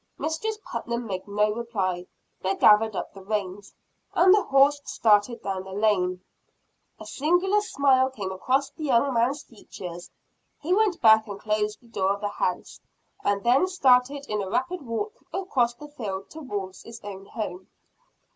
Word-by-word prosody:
Mistress 370 +8 -2
Putnam 235 0 -4
made 190 -2 -5
no 210 +1 +1
reply; 195 -6 -2 0.3
but 190 +1 -1
gathered 215 0 +5
up - - -4
the 195 - -11
reins, 200 -1 -4 0.4
and 370 +1 +6
the 415 - +4
horse 280 -1 +4
started 220 0 +2
down 190 -1 -3
the 190 0 -9
lane. 185 -3 +1 0.8
A - - -9
singular 355 +8 +1
smile 270 -9 +3
came 205 -7 -5
across 265 +9 0
the 310 +1 -7
young 265 0 +2
man's 245 +5 +1
features. 180 -6 -10 0.5
He 335 +5 0
went 410 -3 +2
back 220 -1 +6
and 200 -1 -7
closed 210 0 -1
the - - -19
door 195 -3 0
of 200 - -12
the 205 - -1
house, 180 -2 -3 0.4
and 200 -1 0
then 255 +9 +4
started 275 -5 +3
in 210 -1 -1
a 190 - -4
rapid 265 - -1
walk 290 - -5
across 255 -11 0
the 295 +4 -11
field 200 -9 -6
towards 205 -12 -6
his 230 0 -11
own 195 -1 -8
home. 190 -4 -6
225 Hz, 165 wpm, -26 LUFS, 200-280 Hz, 0.8 s, and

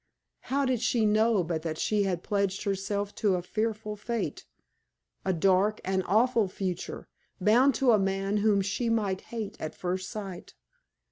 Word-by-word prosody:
How 275 +2 +1
did 255 -3 0
she 235 -2 +2
know 215 -1 +3
but 165 -1 -2
that 160 -1 -3
she 210 +4 +1
had 180 -3 -2
pledged 200 -1 -1
herself 200 0 -2
to 200 -3 +2
a 175 - -3
fearful 215 +1 -2
fate 230 +2 -4 0.8
a 190 - +1
dark, 190 +4 +2
an 190 0 +1
awful 225 +3 +3
future, 185 -1 -4 0.3
bound 240 +8 +4
to 265 -3 +4
a 215 - +5
man 195 +1 0
whom 205 -1 +3
she 200 +5 -1
might 205 -4 0
hate 215 -3 -6
at 155 - -5
first 185 +1 -3
sight? 195 -4 -7
205 Hz, 160 wpm, -28 LUFS, 190-220 Hz, 0.8 s, a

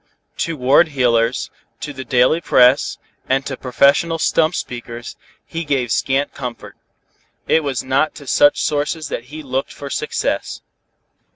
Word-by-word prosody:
To 165 -2 -2
ward 135 +6 +4
heelers, 125 -4 +1 0.3
to 145 - -5
the 130 -1 -7
daily 130 +6 +2
press, 125 -3 +4 0.3
and 135 +1 +1
to 135 - -4
professional 140 +6 +2
stump 165 +1 +2
speakers, 120 0 -6 0.3
he 165 +1 -5
gave 135 -6 -1
scant 135 +4 0
comfort. 125 -3 -7 0.7
It 160 - +3
was 135 -4 -2
not 135 +4 +1
to 145 - -11
such 145 +2 +3
sources 150 +1 -1
that 115 - -5
he 155 +4 -9
looked 135 0 -3
for 140 -1 -8
success. - - -2
135 Hz, 145 wpm, -19 LUFS, 125-150 Hz, 0.7 s, ward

